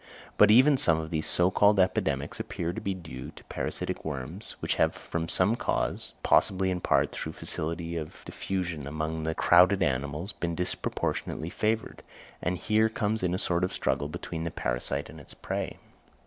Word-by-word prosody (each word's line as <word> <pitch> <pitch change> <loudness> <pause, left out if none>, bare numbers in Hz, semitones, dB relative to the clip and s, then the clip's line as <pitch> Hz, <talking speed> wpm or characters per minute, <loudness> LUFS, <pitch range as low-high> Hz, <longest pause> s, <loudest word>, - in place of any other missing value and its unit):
But 105 - +6
even 130 +6 +7
some 80 -9 +3
of 80 +1 -6
these 80 -2 0
so 90 +1 +4
called 105 +1 +4
epidemics 95 0 0
appear 85 +1 -3
to - - -5
be 100 -1 -2
due 80 -8 -8
to - - -13
parasitic - - -4
worms, 75 - -5
which - - 0
have - - +2
from 80 -1 -4
some 95 +6 +3
cause, - - -2
possibly 95 0 +3
in 90 - -1
part 70 -2 +2
through - - -5
facility 85 +1 -3
of 80 -1 -7
diffusion 90 -7 -3
among 80 +2 -3
the 80 0 -1
crowded 90 +2 +5
animals, 70 - -2
been 85 -1 -3
disproportionally 85 -1 -2
favoured: 110 +1 -1 0.4
and 90 +1 -1
here 110 +4 +2
comes 110 0 -1
in 90 -1 0
a - - 0
sort 85 -1 0
of 90 - 0
struggle 70 - 0
between 80 +2 -5
the 85 - -2
parasite 70 0 -2
and 80 - -11
its 70 - -11
prey. - - -4
85 Hz, 175 wpm, -28 LUFS, 80-95 Hz, 0.4 s, even